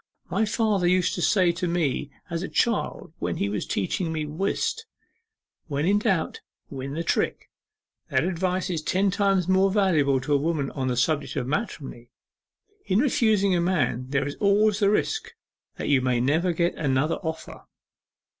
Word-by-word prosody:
My 220 - +2
father 210 -4 +1
used 180 0 +2
to 175 - -3
say 185 -2 +3
to 175 +1 -3
me 160 -5 -1 0.2
as 170 -1 -3
a 190 - -4
child 230 -8 -1
when 85 0 -2
he 100 - -1
was 105 0 -3
teaching 160 - -1
me 155 -1 -2
whist, 195 - -2 0.8
"When 145 -1 -1
in 200 +3 +3
doubt 195 -6 -1 0.3
win 135 0 -5
the 165 - -2
trick!" - - -1 0.6
That - - +2
advice 185 +1 -1
is 165 -3 -2
ten 190 +5 +1
times 195 -2 +1
as 190 +1 +3
valuable 155 -10 +3
to 145 +3 -1
a - - +5
woman 145 -2 -1
on 130 -2 -3
the 125 -1 -1
subject 150 +4 0
of 125 - -1
matrimony. 135 - -4 0.8
In 190 - +2
refusing 220 -6 +3
a 175 - +1
man 135 -8 0
there 140 0 0
is 145 - -6
always 210 0 +3
the 200 -2 +4
risk 435 - -1 0.4
that - - -5
you 140 -3 +3
may 125 -1 +1
never 160 +8 +2
get 170 +1 0
another 145 +1 0
offer. 160 -1 -7
170 Hz, 175 wpm, -25 LUFS, 140-195 Hz, 0.8 s, a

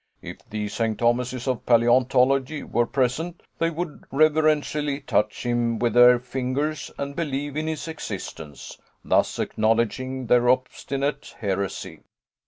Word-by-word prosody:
If - - -7
the 105 0 -3
St. 110 +1 -1
Thomases 125 +2 0
of 130 -3 -1
paleontology 130 +4 +3
were 120 0 0
present, 140 +7 -1 0.2
they 165 - +2
would 165 -1 -5
reverentially 150 -1 +2
touch 105 0 0
him 120 -1 0
with 120 -1 0
their 125 0 +7
fingers 130 +5 -3
and 140 0 -4
believe 145 -3 -3
in 155 +1 -2
his 160 0 -3
existence, 80 - -7 0.3
thus - - +2
acknowledging 115 +4 0
their 120 +1 +4
obstinate 135 +2 -1
heresy. 100 -3 -3
130 Hz, 125 wpm, -24 LUFS, 120-145 Hz, 0.3 s, their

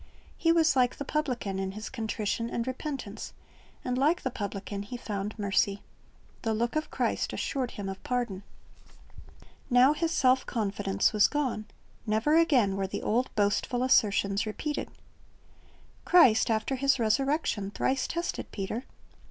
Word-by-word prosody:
He 330 - +2
was 325 -4 +4
like 250 -1 +3
the 285 - -6
publican 250 -11 -2
in 190 0 -3
his 215 +2 -6
contrition 225 -1 -2
and 235 - -2
repentance, 260 -5 -5 0.5
and 250 0 -1
like 315 +6 +2
the 260 - -1
publican 200 -1 -5
he 225 +5 -6
found 210 -2 -4
mercy. 200 -1 0 0.6
The 225 -2 0
look 235 +4 -1
of 310 0 -1
Christ - - -1
assured 260 -3 -2
him 200 -2 -4
of 190 0 -6
pardon. 240 -6 -2 1.3
Now 255 +3 +6
his 330 +2 -1
self 260 -5 +3
confidence 205 -4 0
was 210 -1 +5
gone. 265 -7 -2 0.4
Never 220 +9 +2
again 260 - +3
were 195 -1 -1
the - - -5
old 245 +4 +1
boastful 210 +4 +1
assertions 205 -5 +2
repeated. 295 +7 -3 1.1
Christ 265 -14 +5
after 225 +4 0
His 275 +1 +3
resurrection 235 -2 0
thrice 260 +5 0
tested 340 +1 -3
Peter. 220 +5 -4
235 Hz, 145 wpm, -29 LUFS, 205-270 Hz, 1.3 s, Now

